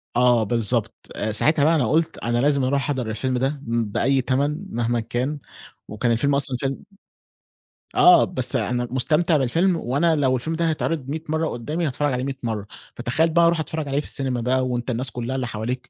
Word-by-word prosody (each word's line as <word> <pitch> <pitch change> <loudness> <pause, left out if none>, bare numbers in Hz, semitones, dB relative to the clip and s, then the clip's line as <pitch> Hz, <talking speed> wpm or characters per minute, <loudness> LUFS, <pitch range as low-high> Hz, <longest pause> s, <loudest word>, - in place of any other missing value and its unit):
آه، 120 -2 +4
بالضبط، 115 0 0 0.2
آآ 110 +1 -2
ساعتها 145 +7 +3
بقى 165 +1 +4
أنا 125 -7 +1
قُلت 165 +1 +1
أنا 120 0 -1
لازم 140 +1 +2
أروح 140 +2 +1
أحضر 130 -6 -2
الفيلم 125 +4 -1
ده 135 +2 -1
م 115 0 0
بأي 135 +3 +2
تَمَن 145 +8 -1
مهمًا 120 0 0
كان، 125 +6 -3 0.5
وكان 115 +3 -1
الفيلم 140 +5 +2
أصلًا 135 -2 0
فيلم 135 0 -2 1.2
آه، 355 -1 +7
بس 130 -8 0
أنا 120 0 -1
مستمتع 155 +5 +2
بالفيلم 165 +8 +2
وأنا 160 +4 +1
لو 130 -3 +2
الفيلم 160 +7 -3
ده 165 0 +1
هيتعرض 155 -3 -2
100 160 +2 -4
مرة 160 0 0
قُدّامي 150 +8 -3
هاتفرّج 145 +1 -1
عليه 125 +1 -2
100 135 -1 -4
مرّة، 105 -3 -3 0.3
فتخيّل 140 +8 +1
بقى 170 +1 +4
أروح 170 -1 +2
أتفرّج 160 -1 -4
عليه 140 +1 0
في - - -5
السينما 130 -3 -3
بقى 130 +1 +1
وأنت 120 0 -3
الناس 125 +1 -1
كُلّها 120 +2 -4
اللي 130 -2 -2
حواليك 120 +4 -4
130 Hz, 195 wpm, -23 LUFS, 120-150 Hz, 1.2 s, آه